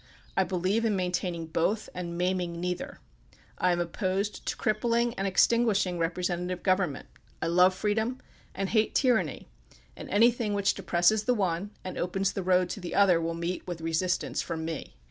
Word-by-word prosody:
I -, -, +4 dB
believe 190 Hz, +5 st, 0 dB
in 220 Hz, -3 st, +1 dB
maintaining 180 Hz, -2 st, -2 dB
both 170 Hz, +7 st, 0 dB
and 170 Hz, -1 st, -5 dB
maiming 180 Hz, -1 st, -1 dB
neither. 180 Hz, 0 st, -3 dB, 0.6 s
I 180 Hz, -, +3 dB
am 175 Hz, -, +1 dB
opposed 190 Hz, +4 st, -2 dB
to -, -, -2 dB
crippling 230 Hz, +2 st, +1 dB
and 195 Hz, -2 st, -2 dB
extinguishing 200 Hz, -2 st, +2 dB
representative 180 Hz, +1 st, -2 dB
govern 185 Hz, -5 st, +2 dB
ment. -, -, -10 dB, 0.3 s
I -, -, -2 dB
love 180 Hz, +2 st, +4 dB
freedom 220 Hz, +5 st, 0 dB, 0.4 s
and 195 Hz, 0 st, -2 dB
hate 220 Hz, -1 st, +1 dB
tyranny, 250 Hz, -4 st, +1 dB, 0.5 s
and -, -, -9 dB
any1,hing 230 Hz, -1 st, +3 dB
which 200 Hz, -1 st, +2 dB
depresses 180 Hz, +5 st, +2 dB
the 250 Hz, -, +3 dB
one 190 Hz, -1 st, -1 dB
and 185 Hz, -, -5 dB
opens 190 Hz, +2 st, 0 dB
the 195 Hz, -, -2 dB
road 180 Hz, 0 st, +3 dB
to -, -, -5 dB
the 180 Hz, -2 st, -5 dB
other 190 Hz, -4 st, +5 dB
will 165 Hz, 0 st, -2 dB
meet 170 Hz, +3 st, -4 dB
with 175 Hz, -2 st, -4 dB
resistance 165 Hz, +3 st, -1 dB
from 160 Hz, -2 st, -4 dB
me. 160 Hz, -3 st, -6 dB
185 Hz, 170 wpm, -28 LUFS, 175-205 Hz, 0.6 s, other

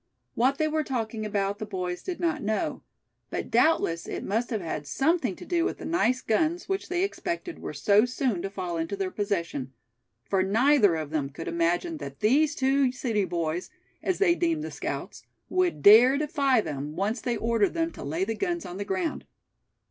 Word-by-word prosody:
What 260 Hz, +4 st, +2 dB
they 310 Hz, -, +1 dB
were 310 Hz, 0 st, 0 dB
talking 225 Hz, -5 st, -3 dB
about 200 Hz, -1 st, -1 dB
the 215 Hz, -, -3 dB
boys 180 Hz, -3 st, -3 dB
did 365 Hz, -2 st, -5 dB
not 325 Hz, -3 st, 0 dB
know; 215 Hz, +1 st, -1 dB, 0.5 s
but -, -, -4 dB
doubtless 170 Hz, -, +2 dB
it -, -, -4 dB
must 225 Hz, +5 st, -1 dB
have 225 Hz, -4 st, -1 dB
had 160 Hz, -4 st, -5 dB
something 270 Hz, -, +1 dB
to -, -, -11 dB
do 345 Hz, -2 st, +1 dB
with -, -, -1 dB
the -, -, -8 dB
nice 255 Hz, -7 st, +1 dB
guns 315 Hz, +10 st, 0 dB
which 385 Hz, 0 st, -2 dB
they 360 Hz, +1 st, +1 dB
expected 350 Hz, -3 st, -3 dB
were -, -, -5 dB
so 210 Hz, +2 st, +4 dB
soon 245 Hz, -6 st, -1 dB
to 195 Hz, -, -3 dB
fall 180 Hz, -3 st, -4 dB
into 165 Hz, +5 st, -2 dB
their 195 Hz, -2 st, -2 dB
possession; 170 Hz, -, -2 dB, 0.5 s
for 190 Hz, +8 st, +1 dB
neither 215 Hz, -, +4 dB
of 155 Hz, -2 st, -4 dB
them 145 Hz, -3 st, -1 dB
could 150 Hz, +4 st, -8 dB
imagine 175 Hz, -, 0 dB
that 140 Hz, -, -8 dB
these 290 Hz, +7 st, +3 dB
two 270 Hz, -1 st, +2 dB
city 230 Hz, -5 st, -1 dB
boys, 170 Hz, 0 st, -2 dB, 0.3 s
as 370 Hz, -, 0 dB
they 385 Hz, -4 st, +4 dB
deemed 335 Hz, -3 st, 0 dB
the -, -, -5 dB
scouts, -, -, -5 dB, 0.3 s
would 365 Hz, -1 st, 0 dB
dare 240 Hz, +6 st, +8 dB
defy 280 Hz, -5 st, +2 dB
them, 145 Hz, -3 st, -5 dB
once 210 Hz, +6 st, -1 dB
they 240 Hz, -2 st, -1 dB
ordered 225 Hz, -1 st, +1 dB
them 330 Hz, 0 st, 0 dB
to -, -, -9 dB
lay 160 Hz, +6 st, -1 dB
the 225 Hz, -, -2 dB
guns 345 Hz, -, -2 dB
on 180 Hz, -, -7 dB
the 200 Hz, -, -2 dB
ground. 355 Hz, -, -2 dB
225 Hz, 195 wpm, -27 LUFS, 185-310 Hz, 0.5 s, dare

